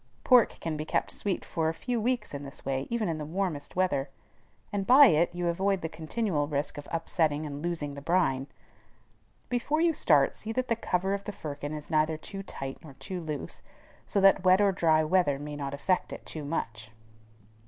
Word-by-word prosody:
Pork 250 -3 +5
can 160 -2 -3
be 155 - -3
kept - - -1
sweet 200 -3 -2
for 160 -2 0
a 165 - -3
few 240 +3 -2
weeks 245 -3 -1
in 140 - -4
this 140 -1 -9
way, 135 0 -1
even 235 -3 0
in 160 -2 -2
the - - -4
warmest 160 -3 -3
weather; 150 -7 +1 0.6
and 195 -1 -2
by 270 +4 +9
it 170 - +4
you 175 0 -2
avoid 190 +2 +1
the 160 - -2
continual 160 -2 -2
risk 145 0 -2
of 145 - -10
upsetting 160 -2 0
and 145 -1 -6
losing 160 -4 -3
the 140 - -8
brine. 145 -5 +1 1.0
Before 250 +5 0
you 335 0 +3
start, 150 - +3
see 220 - -5
that 255 +2 -1
the 230 - +3
cover 190 -3 -1
of 200 0 -3
the - - -3
firkin 145 -5 -6
is 150 +2 -8
neither 155 0 +2
too 195 +5 -8
tight 135 -8 -7
nor 145 -4 -13
too 185 +2 -6
loose, 155 -3 -5 0.5
so 200 - +1
that 195 -1 +5
wet 185 +1 +6
or 200 -1 +4
dry 160 -4 +3
weather 155 -3 +2
may 145 +1 -6
not 140 -1 -4
affect 180 +6 0
it - - -8
too 155 -2 -6
much. 115 -8 -4
165 Hz, 205 wpm, -29 LUFS, 145-195 Hz, 1.0 s, by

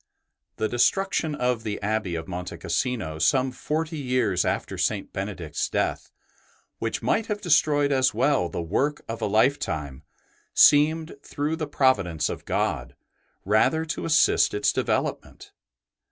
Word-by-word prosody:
The 110 - -1
destruction 160 - +1
of 125 -4 0
the 105 -2 -4
Abbey 105 -4 -1
of 80 +1 -5
Monte 90 -1 -6
Cassino 110 -12 -2
some 130 - +2
forty 155 +4 -3
years 125 -9 +1
after - - -2
St. - - -2
Benedict's 95 -5 -4
death, - - -2 0.7
which - - -3
might 225 - +1
have 210 -1 -2
destroyed 145 -5 +2
as 130 -1 +3
well 135 -12 +1
the 85 - -4
work 140 - -1
of 115 0 -5
a - - 0
lifetime, 100 - 0 0.5
seemed, 155 +2 +5
through 145 +2 -3
the 160 -2 -4
providence 100 - +1
of - - -6
God, - - -2 0.5
rather 110 +11 +2
to 160 - -4
assist 165 -8 +3
its 105 - +1
develop - - -1
ment. - - -16
125 Hz, 140 wpm, -25 LUFS, 95-150 Hz, 0.7 s, seemed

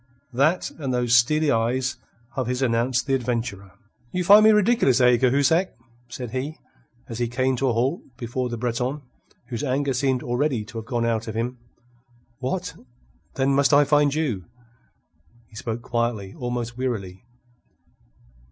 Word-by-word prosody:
That 155 +8 +1
and 135 -4 -2
those 125 -1 +1
steely 145 +5 +4
eyes 125 +3 0 0.4
of 130 -3 -2
his 125 +1 -1
announced 120 +1 +1
the 135 - -1
adventurer. 115 -7 -2 0.4
"You 180 - -1
find 205 +4 +8
me 220 - +7
ridiculous, 210 - +4
eh, 125 -1 +6
Cahusac?" 140 +7 +2 0.3
said 120 -1 -6
he, 135 +5 -4 0.5
as 115 0 -6
he 120 - 0
came 130 +2 0
to 135 - 0
a 125 - +2
halt 130 +9 0 0.2
before 125 +1 -3
the 120 - -4
Breton, 125 +4 -2 0.5
whose 120 +2 -4
anger 140 0 0
seemed 130 -1 0
already 120 -2 -1
to 115 +1 -7
have 110 - -9
gone 120 -3 -1
out 115 -1 -1
of 110 - -5
him. 120 +2 -3 0.8
"What, 135 +8 -3 0.6
then, 135 +1 +1
must 140 +1 +3
I 145 - +7
find 145 0 +3
you?" 125 - -1 1.0
He 110 - -19
spoke 115 +1 -5
quietly, 115 -5 -2
almost 120 -1 -4
wearily. 100 -8 -3
125 Hz, 155 wpm, -24 LUFS, 120-140 Hz, 1.0 s, find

